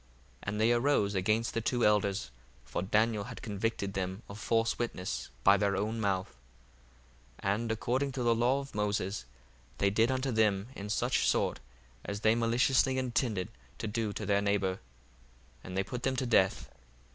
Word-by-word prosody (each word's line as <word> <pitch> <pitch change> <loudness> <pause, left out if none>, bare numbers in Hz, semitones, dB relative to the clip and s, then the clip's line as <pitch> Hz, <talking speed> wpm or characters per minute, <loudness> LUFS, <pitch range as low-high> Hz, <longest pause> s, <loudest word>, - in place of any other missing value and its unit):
1:61 65 - -31 0.3
And 105 +1 -3
they 115 +2 +4
arose 120 -4 +2
against 105 +3 +1
the 115 - -1
two 120 +2 +1
elders, 100 - +2 0.3
for - - -3
Daniel 105 +2 +1
had 125 0 -9
convicted 100 -2 -2
them 95 +2 -3
of 100 +2 -9
false 115 +2 +1
witness 105 -6 -3
by 100 - +7
their 100 -1 +1
own 110 +4 -1
mouth: 95 -7 -1 1.1
1:62 - - +1
And 115 +2 -2
according 130 +5 0
to 130 -2 -2
the 120 -1 +4
law 125 +4 +2
of 135 - -11
Moses 105 - -1 0.5
they 100 0 +2
did 115 +4 +3
unto 130 0 0
them 105 -2 +2
in 100 +1 -6
such 105 - +1
sort - - +1 0.4
as 100 0 -5
they 110 0 +5
maliciously 125 +3 +2
intended 120 -6 -1 0.3
to 115 - -5
do 110 0 -1
to - - -4
their 100 -1 +2
neighbour: 100 -2 0 0.8
and 90 +1 -6
they 95 - +2
put 125 +5 -6
them 130 +1 0
to 130 - -1
death. 100 -6 +2
110 Hz, 175 wpm, -31 LUFS, 100-120 Hz, 1.1 s, by